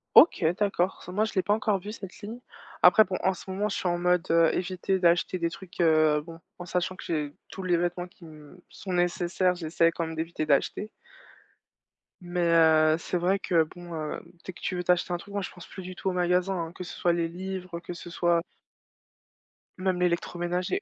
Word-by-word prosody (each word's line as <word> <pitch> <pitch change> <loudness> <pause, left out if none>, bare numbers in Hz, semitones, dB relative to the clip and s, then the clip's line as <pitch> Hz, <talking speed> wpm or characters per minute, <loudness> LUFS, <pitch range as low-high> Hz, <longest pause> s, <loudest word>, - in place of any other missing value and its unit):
OK 195 - +7
d'accord, 195 -3 0
ça 180 - -9
moi 210 +4 +1
je 220 - -5
l'ai 190 - +2
pas 205 - +1
encore 210 -2 +1
vu 205 +3 -7
cette 195 -4 -9
ligne. 220 +3 -7 0.4
Après 220 - +8
bon, 185 -2 -3
en 190 - +3
ce 185 - -11
moment 195 +3 -1
je 205 - -3
suis - - -2
en 175 - 0
mode, 180 0 +1
heu, 165 -1 +4
éviter 185 +1 -1
d'acheter 175 +1 +2
des 170 0 0
trucs, 175 0 -7
heu 155 -2 +4
bon, 165 +1 -11 0.2
en 175 - -6
sachant 180 +1 -1
que - - -10
j'ai 150 -3 -2 0.2
tous 190 - -7
les 180 -2 +2
vêtements 175 +1 -2
qui 175 - -20
me 155 +2 -14
sont 190 -3 -6
nécessaires, 175 +1 +1
j'essaie 165 0 +2
quand 165 - -3
même 160 0 -6
d'éviter 160 0 -3
d'acheter. 150 +8 +1 1.3
Mais, 175 0 -3
heu, 160 -2 +5
c'est 180 - -2
vrai 180 +3 +2
que 170 -4 +3
bon, 175 +2 -10
hem, 155 -2 -4 0.2
dès 185 - -6
que - - -15
tu 185 - -2
veux 180 - -2
t'acheter 180 0 +2
un - - 0
truc, 200 +3 -12
moi 200 - -1
je 185 - -4
pense 175 - -12
plus 190 - -9
du 185 0 -8
tout 190 - -2
au - - -2
magasin, 180 +1 +1
hein, - - -11
que 185 - -7
ce 180 - -8
soit 175 - +2
les 170 -1 0
livres, 180 0 -6
que 175 - -7
ce 175 0 -9
soit 170 -1 +1 1.4
Même 185 -1 0
l'électroménager 180 - -1
175 Hz, 220 wpm, -27 LUFS, 170-185 Hz, 1.4 s, Après